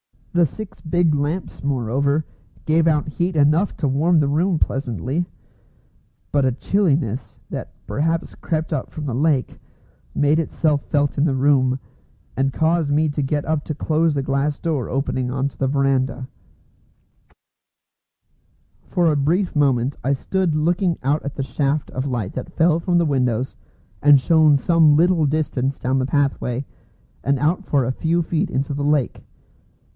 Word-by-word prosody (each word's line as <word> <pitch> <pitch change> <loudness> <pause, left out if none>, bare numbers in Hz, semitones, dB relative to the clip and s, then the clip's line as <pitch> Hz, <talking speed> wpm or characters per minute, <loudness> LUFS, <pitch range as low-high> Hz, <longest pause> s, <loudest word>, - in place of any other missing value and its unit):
The 175 -2 +4
six 215 +8 -9
big 170 -1 +1
lamps, 150 +6 -3
moreover, 140 +3 0 0.4
gave 160 +1 +3
out 150 -2 +2
heat 175 +3 -2
enough 155 +6 +3
to 150 - 0
warm 155 +5 +2
the 145 -2 +1
room 170 +4 +1
pleasantly. 135 - -2 1.1
But 140 -2 +2
a 130 - +1
chilliness, 140 - 0
that - - -6
perhaps 160 - -1
crept 160 0 -3
up 135 - -3
from 155 - -7
the 135 - -3
lake, 140 0 0 0.6
made 145 +2 +3
itself 155 -2 0
felt 145 -1 0
in 140 - +3
the 140 -4 +1
room, 130 -1 +2 0.6
and 135 0 0
caused 160 -1 +1
me 150 +2 +2
to 145 0 -2
get 145 +1 -1
up 155 -2 -1
to 155 - -4
close 155 +1 +1
the 140 - -1
glass 140 +2 0
door 155 -7 -2
opening 130 -1 -1
on 135 +2 -1
to - - -22
the 135 - 0
verandah. 135 -1 0 2.6
For 175 -3 +2
a 150 - +1
brief 170 +7 0
moment 135 -2 +1
I 135 +3 +2
stood 180 +4 -1
looking 170 +3 +1
out 145 +4 +1
at 140 - -5
the 135 - -2
shaft 140 +2 -1
of 130 +2 -3
light 120 -8 -3
that 130 - -6
fell 165 0 +3
from 175 +1 +1
the 170 - +3
windows 125 -3 0 0.4
and 145 -1 +7
shone 155 +1 +4
some 160 0 +4
little 170 0 +3
distance 140 -3 -1
down 130 +1 0
the 130 - -1
pathway, 135 -3 -1 0.6
and 140 +1 +1
out 165 +7 0
for 140 -3 +1
a 130 - 0
few 165 +5 0
feet 160 0 -1
into 135 +2 -2
the 140 0 -2
lake. 145 -4 0
145 Hz, 160 wpm, -21 LUFS, 135-160 Hz, 2.6 s, and